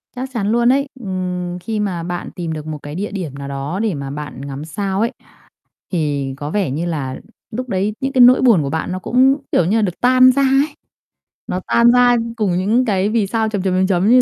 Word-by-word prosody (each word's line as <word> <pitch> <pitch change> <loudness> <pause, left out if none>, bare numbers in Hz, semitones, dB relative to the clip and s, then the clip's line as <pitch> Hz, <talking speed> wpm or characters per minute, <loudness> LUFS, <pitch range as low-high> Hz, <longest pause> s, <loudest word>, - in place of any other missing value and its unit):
Chắc 260 +1 -4
chắn 215 -3 -1
luôn 240 +1 +3
ấy. 280 +1 0
Ừm, 180 -3 -4
khi 215 +4 -3
mà 180 -5 -2
bạn 175 0 -5
tìm 170 -2 -4
được 155 0 -6
một 155 -1 -4
cái 145 +1 -7
địa 205 +3 -3
điểm 175 -9 -5
nào 140 0 -7
đó 140 +7 -4
để 215 -5 0
mà 140 -2 -5
bạn 145 -2 -7
ngắm 140 +2 -6
sao 195 +4 -3
ấy 235 - +1 0.8
thì 145 -5 -1
có 145 +1 -5
vẻ 195 -6 0
như 160 +6 -2
là 140 -6 -3 0.3
lúc 255 +2 -5
đấy 200 +2 -1
những 270 +1 -2
cái 255 - +2
nỗi 250 +1 +8
buồn 225 - +5
của 140 - -3
bạn 160 +3 -2
nó 185 - -3
cũng, 260 +7 +3 0.2
kiểu - - +3
như 200 +7 +1
là, 220 - +2
được 180 -4 -2
tan 255 +1 +6
ra 275 +1 +1
ấy, 275 +2 +2 0.7
nó 180 - -2
tan 235 0 +5
ra 245 0 +5 0.2
cùng 205 -4 +1
những 225 +7 +2
cái 200 -1 +1
vì 215 -3 +1
sao 220 0 0
chấm, 205 -3 -2
chấm, 185 -1 0
chấm, 185 0 +2
chấm 190 +2 +2
như 250 +1 +7
195 Hz, 240 wpm, -18 LUFS, 160-235 Hz, 0.8 s, nỗi